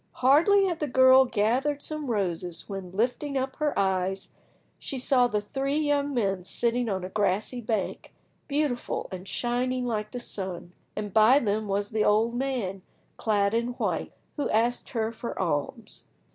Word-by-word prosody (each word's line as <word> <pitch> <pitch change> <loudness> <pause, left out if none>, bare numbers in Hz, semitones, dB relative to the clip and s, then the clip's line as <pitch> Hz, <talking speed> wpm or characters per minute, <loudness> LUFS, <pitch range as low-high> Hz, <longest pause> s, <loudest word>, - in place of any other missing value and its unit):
Hardly 330 +10 +5
had 345 -4 -1
the 300 - -1
girl 260 0 +6
gathered 255 +6 0
some 305 -3 -5
roses, 180 -5 -2
when, 195 -2 -6
lifting 250 +7 -1
up 265 0 -2
her 300 -1 0
eyes, 190 0 0 0.5
she 275 - -5
saw 250 -1 +3
the 210 -3 -1
three 270 +7 -2
young 290 -1 +1
men 195 -8 0
sitting 235 +5 0
on 190 -2 -2
a 185 - -4
grassy 205 +5 0
bank, 220 -3 -3 0.4
beautiful, 285 -4 -1
and 185 0 -7
shining 250 +2 -1
like 215 -3 -2
the 245 - -5
sun, 185 -6 -5 0.2
and 205 -2 -4
by 225 +5 +6
them 215 -4 0
was 200 +1 -1
the 215 -1 +1
old 220 +3 +3
man, 240 -7 -2 0.4
clad 205 -2 +1
in 235 +2 0
white, - - -2 0.3
who 290 - -1
asked 235 +3 +1
her 225 -2 -1
for 230 +1 -6
alms. 170 +6 -2
235 Hz, 160 wpm, -27 LUFS, 200-260 Hz, 0.5 s, girl